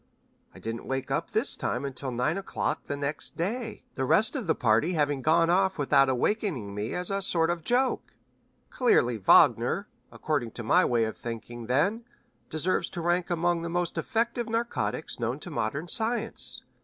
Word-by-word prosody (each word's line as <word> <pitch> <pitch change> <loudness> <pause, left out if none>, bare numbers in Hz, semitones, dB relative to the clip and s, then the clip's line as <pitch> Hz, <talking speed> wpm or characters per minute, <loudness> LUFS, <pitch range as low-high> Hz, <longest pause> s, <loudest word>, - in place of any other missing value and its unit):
I - - -16
didn't 115 +1 -6
wake 135 0 -3
up - - -1
this 225 +6 +3
time 125 +4 -2
until 135 0 -3
nine 125 +6 0
o'clock 195 0 -3
the 145 - -3
next 145 +1 -2
day, 220 +5 -3
the 135 - -3
rest 180 - +3
of 255 -6 -3
the - - +2
party 125 +8 +2
having 145 -4 0
gone 165 +3 +3
off 190 +1 +2
without 135 -2 +4
awakening 130 - -1
me 105 +2 -4
as 180 +2 +1
a 195 0 -1
sort 165 -2 +1
of 170 -2 -4
joke. 250 +5 0 0.6
Clearly 125 - +2
Wagner, 95 - +4 0.2
according 140 -8 -2
to 120 - -6
my 110 - +4
way 120 -2 +2
of 110 - -3
thinking, 120 0 -7
then, 180 - +1 0.5
deserves 160 +4 -1
to 175 - -6
rank 175 +2 0
among 175 0 +1
the 170 - -4
most 175 0 -1
effective 235 0 -1
narcotics 230 - -2
known 120 +4 -2
to 175 - -7
modern 140 +5 -2
science. 225 +3 0
165 Hz, 175 wpm, -27 LUFS, 130-195 Hz, 0.6 s, without